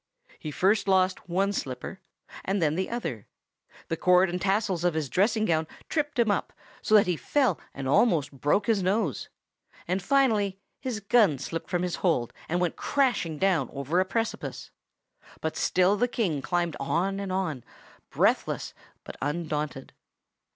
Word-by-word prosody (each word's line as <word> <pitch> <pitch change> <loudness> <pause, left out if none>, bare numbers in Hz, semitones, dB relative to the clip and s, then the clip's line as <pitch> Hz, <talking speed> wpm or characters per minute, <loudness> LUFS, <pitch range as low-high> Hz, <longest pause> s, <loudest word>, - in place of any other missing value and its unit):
He 155 - -5
lost 145 - -8
first 190 -2 +2
one 195 +3 +1
slipper, 135 +3 -5 0.4
and 195 +1 0
then 155 -3 +2
the 185 +3 -2
other; 165 - -4 0.6
the 165 - -1
cord 180 +2 +4
and 180 0 -3
tassels 195 -3 0
of 175 -2 +1
his 155 -4 -2
dressing 215 +3 +2
gown 160 -4 +1 0.2
tripped 295 -3 -1
him 230 -3 +3
up, 200 - -2 0.3
so 215 - +3
that 210 - +7
he 180 -2 0
fell 255 - +1
and 135 -1 -6
almost 150 - +3
broke 145 +8 +1
his 225 -4 +2
nose; 195 +5 0 0.6
and 185 +2 0
finally 210 -5 +2 0.2
his 250 -5 -4
gun 200 - +4
slipped 140 +5 -5
from 175 0 0
his 180 -1 -2
hold 145 -10 0 0.2
and 175 +2 +1
went 175 -2 -1
crashing 245 - 0
down 190 0 +1
over 140 +6 -1
a 185 - +3
precipice; 225 +4 -3 0.7
but 160 - -3
still 185 +2 +3
the 245 +4 +1
King 185 - -1
climbed 175 +1 -1
on 185 +8 0
and 200 -1 -4
on, 175 -10 -2 0.5
breathless - - 0 0.3
but - - -9
undaunted. 150 -2 -3
185 Hz, 160 wpm, -27 LUFS, 160-205 Hz, 0.7 s, that